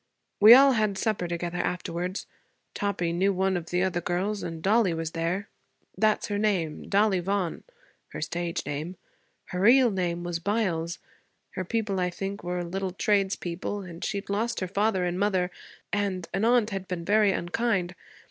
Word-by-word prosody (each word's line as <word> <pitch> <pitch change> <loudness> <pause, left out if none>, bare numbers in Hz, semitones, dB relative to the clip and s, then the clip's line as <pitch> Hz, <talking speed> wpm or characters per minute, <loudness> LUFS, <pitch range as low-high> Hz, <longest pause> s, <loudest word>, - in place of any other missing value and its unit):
We 215 +3 +11
all 275 +1 +7
had 215 -5 +1
supper 200 -4 -1
together 175 0 -3
afterwards. 180 +1 -3 0.5
Toppie 180 -4 -1
knew 190 +3 +2
one 190 0 +1
of 170 -2 -3
the 180 +1 +1
other 175 -2 0
girls, 190 +5 -1
and 165 -1 -5
Dollie 200 -3 +3
was 165 0 -3
there. 170 +5 -2 0.5
That's 215 -1 +2
her 205 0 -1
name 185 -8 -1
Dollie 200 -1 +3
Vaughan 185 -1 -2 0.4
her - - -8
stage 170 -1 -3
name. 150 +5 -4 0.5
Her 180 - -3
real 240 +4 +6
name 175 -3 -2
was 175 -1 -3
Byles. 175 -4 -1 0.5
Her 185 - -4
people, 210 -1 -1
I 180 0 +1
think, 195 +2 -5
were 180 0 -2
little 185 +2 -3
tradespeople, 195 -1 -1
and 170 -2 -9
she'd 200 -1 -3
lost 225 +4 -1
her 185 - -2
father 200 -1 +1
and 175 +1 -2
mother, 190 -3 +1 0.4
and 195 -4 -1
an 205 - +1
aunt 235 -2 +3
had 195 -1 -4
been 175 -2 -4
very 210 +1 +4
unkind. 185 0 -1
190 Hz, 165 wpm, -27 LUFS, 175-205 Hz, 0.5 s, We